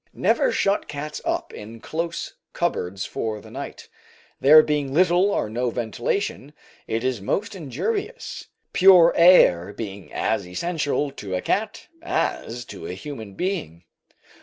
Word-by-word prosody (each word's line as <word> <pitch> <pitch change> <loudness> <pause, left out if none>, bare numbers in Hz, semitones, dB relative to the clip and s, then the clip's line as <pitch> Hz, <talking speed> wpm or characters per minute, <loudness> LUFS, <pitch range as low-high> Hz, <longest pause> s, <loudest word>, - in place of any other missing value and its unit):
Never - - +2
shut 200 - +1
cats 150 +1 -6
up - - -2
in 110 +2 -9
close 165 +6 -4 0.2
cupboards 100 - -2
for 110 -2 -3
the - - -14
night, - - -8 0.5
there 155 +3 +8
being 145 -3 -1
little 180 +3 +4
or 200 - 0
no 120 +3 -1
ventilation; 125 - -3 0.3
it 115 +1 -2
is 130 -5 -1
most 205 - -2
injurious, 395 - -4 0.3
pure 180 -3 +7
air 135 - +6
being 100 -3 -7
as - - -1
essential 145 - -1
to 100 -8 -5
a 90 - -1
cat 220 +2 -2 0.2
as 125 - -2
to 80 - -8
a - - -5
human 110 -3 -8
being. 95 - -3
145 Hz, 135 wpm, -23 LUFS, 110-180 Hz, 0.5 s, there